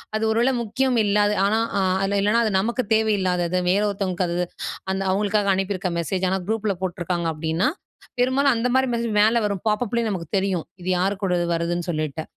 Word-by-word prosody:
அது 215 - -1
ஒருவேளை 235 +4 +2
முக்கியம் 250 +3 0
இல்லாத, 205 0 +2 0.2
ஆனா 220 +2 +2 0.2
அ - - +2 0.2
அதில 200 +1 +1
இல்லைனா 220 +4 +3
அது 215 - 0
நமக்கு 235 +4 -1
தேவை 220 0 +2
இல்லாதது, 180 -1 0
வேற 200 +2 +2
ஒருத்தவங்களுக்கு 190 -2 -2
அது 170 - -2
அது - - 0 0.5
அந்த 190 - -2
அவுங்களுக்காக 205 0 +1
அனுப்பியிருக்க 190 0 -2
மெசேஜ். 185 +3 -1
ஆனா 190 - +1
குரூப்ல 220 -2 0
போட்ருக்காங்க 175 -1 -2
அப்டின்னா, 160 +4 0 0.5
பெரும்பாலும் 265 +3 +3
அந்த 230 +2 0
மாரி 260 0 +3
மெசேஜ் 235 -1 -1
மேல 220 +3 +4
வரும். 200 -3 -2
பாப்பப்லயே 230 +2 0
நமக்கு 180 -5 -4
தெரியும். 190 -4 0 0.2
இது 180 - -4
யார் 190 +3 +1
கூட 185 -3 +1 0.2
வருதுன்னு 170 +1 -1
சொல்லிட்டு. 155 -1 -2
200 Hz, 185 wpm, -23 LUFS, 180-220 Hz, 0.5 s, மேல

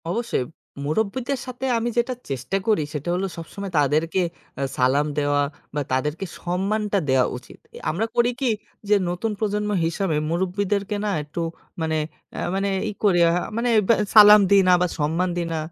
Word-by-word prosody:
অবশ্যই, 230 - -1 0.4
মুরুব্বিদের 230 - -1
সাথে 255 +1 -5
আমি 230 +1 -1
যেটা 240 +2 +1 0.2
চেষ্টা 135 +7 -2
করি, 210 -8 +3
সেটা 150 +3 -4
হল 185 - -1
সবসময় 190 +4 -7
তাদেরকে 155 +5 +1 0.4
আ - - -2 0.2
সালাম 135 +4 +3
দেওয়া, 145 0 +2 0.3
বা 145 - 0
তাদেরকে 150 +8 -1
সম্মানটা 200 +3 0
দেওয়া 130 -1 +4
উচিত। 125 - -14 0.2
এ - - -8
আমরা 190 +8 -1
করি 240 +1 +3
কি? 260 - +2 0.4
যে 210 - +6
নতুন 180 +6 -2
প্রজন্ম 210 -1 -1 0.2
হিসাবে 165 0 -1
মুরুব্বিদেরকে 200 +4 -1
না - - 0
একটু 150 +3 -5 0.4
মানে 160 -1 0 0.4
আ - - -3 0.2
মানে 195 +1 0 0.2
ই - - -3
করি 190 -4 +4
আ - - +3 0.3
মানে 240 +1 +1 0.2
বে - - +6 0.2
সালাম 210 0 +10
দিই, 200 -1 +6
না - - +7
বা 180 - +3
সম্মান 165 +5 +1
দিই 170 -1 -1
না - - -1
190 Hz, 170 wpm, -23 LUFS, 155-210 Hz, 0.4 s, সালাম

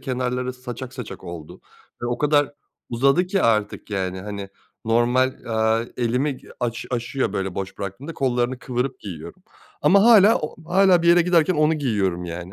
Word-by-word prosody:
kenarları 125 -1 -2
saçak 125 0 -8
saçak 125 -4 -8
oldu 85 -3 -9 0.4
ve - - -1
o 120 - -2
kadar 145 -1 +2 0.4
uzadı 135 +9 +2
ki 190 +1 0
artık, 105 -2 0
yani, 95 -2 -2
hani, 100 0 -6 0.4
normal, 120 +3 +2
eee, 110 0 0
elimi 125 +3 0 0.2
aş 115 -1 -3
aşıyor 125 +3 -2
böyle 95 -1 -3
boş 95 0 -5
bıraktığımda. 110 - -6
Kollarını 125 -1 0
kıvırıp 125 +1 -3
giyiyorum 85 - -9 0.4
ama 200 +1 +5
hâlâ 225 -2 +7
o 150 - -6 0.2
hâlâ 190 -3 +5
bir 170 - +2
yere 175 0 +6
giderken 175 0 +3
onu 155 +1 +3
giyiyorum, 100 - -1
yani. 85 +2 -7
125 Hz, 160 wpm, -22 LUFS, 105-145 Hz, 0.4 s, hâlâ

